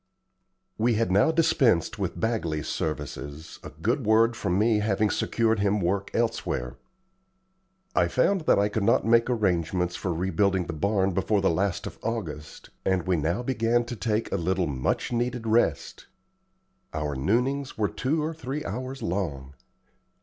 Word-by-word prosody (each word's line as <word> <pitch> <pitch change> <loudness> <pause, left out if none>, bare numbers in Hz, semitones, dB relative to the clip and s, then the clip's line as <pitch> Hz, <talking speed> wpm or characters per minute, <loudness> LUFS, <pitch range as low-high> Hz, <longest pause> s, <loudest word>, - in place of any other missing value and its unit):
We 115 +1 +2
had 110 -4 +1
now 100 +11 +4
dispensed 155 - +2
with - - -3
Bagley's 85 -10 -1
services, 75 0 -5
a - - -8
good 110 - -1
word 115 +2 +4
from 95 -5 -1
me 110 +1 +3
having 105 0 +1
secured 115 -2 +1
him 100 +1 +2
work 100 +2 -1
elsewhere. 110 - -1 1.2
I - - +4
found 200 -2 +2
that - - +5
I 100 +1 +3
could 105 +1 -2
not 100 - +3
make 115 +1 +4
arrangements 90 -5 0
for 95 - -3
rebuilding 95 +2 +1
the 85 - -5
barn 95 +4 +1
before 105 +4 +1
the 95 -2 +2
last 95 +2 -1
of - - -8
August, 85 - -5
and 95 -2 +1
we 95 -1 +2
now 85 +9 -1
began 120 -1 +1
to 120 - -5
take 110 +1 -1
a - - 0
little 90 +2 0
much 70 - -1
needed 120 0 -1
rest. 110 -10 0 0.9
Our 75 -1 -2
noonings 125 - 0
were 105 -1 +2
two 150 +8 -1
or 160 +2 -2
three 150 -1 -5
hours 130 +6 -5
long. 70 -8 -3
105 Hz, 155 wpm, -26 LUFS, 85-115 Hz, 1.2 s, that